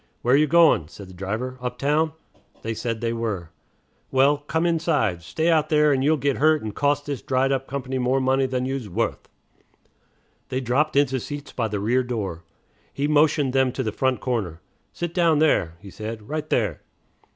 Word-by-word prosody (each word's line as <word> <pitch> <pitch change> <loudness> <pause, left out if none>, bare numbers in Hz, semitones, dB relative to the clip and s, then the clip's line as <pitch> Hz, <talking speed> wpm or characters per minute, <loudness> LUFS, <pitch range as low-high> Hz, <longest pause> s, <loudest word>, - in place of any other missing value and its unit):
"Where 125 +2 +4
you 150 +2 +4
goin'?" 160 - +5
said 95 +3 -12
the - - -12
driver. 110 +8 -4
"Uptown?" 145 +6 0 0.5
They 115 - -2
said 115 0 -3
they 115 -1 -1
were. 105 -8 -3 0.6
"Well, 135 +2 +4
come 160 +3 -1
inside. 135 - +1
Stay 160 - -2
out 155 -1 +2
there, 150 -1 +4
and 130 -1 0
you'll 155 +2 +3
git 140 -1 0
hurt 155 -1 +3
and 105 -1 -4
cost 145 +2 0
this 140 -3 -4
dried 135 +1 +1
up 135 -1 -1
company 130 -1 -3
more 130 +2 +1
money 130 0 +2
than 125 0 -2
you's 130 -5 -3
wuth." 85 - -2 1.2
They 130 - -1
dropped 135 +5 0
into 135 -2 +2
seats 145 +3 -7
by 115 -3 -1
the 105 -1 -3
rear 120 +6 +2
door. 105 -9 -4 0.5
He 140 +1 -1
motioned 150 -2 +3
them 130 -1 +3
to 130 - -2
the 110 - -2
front 130 +3 0
corner. 105 -10 -2 0.3
"Sit 175 -1 -4
down 170 -3 +3
there," 120 - +2
he 100 0 -12
said, 110 +3 -7
"right 155 0 -4
there." 105 - 0
130 Hz, 185 wpm, -24 LUFS, 110-145 Hz, 1.2 s, goin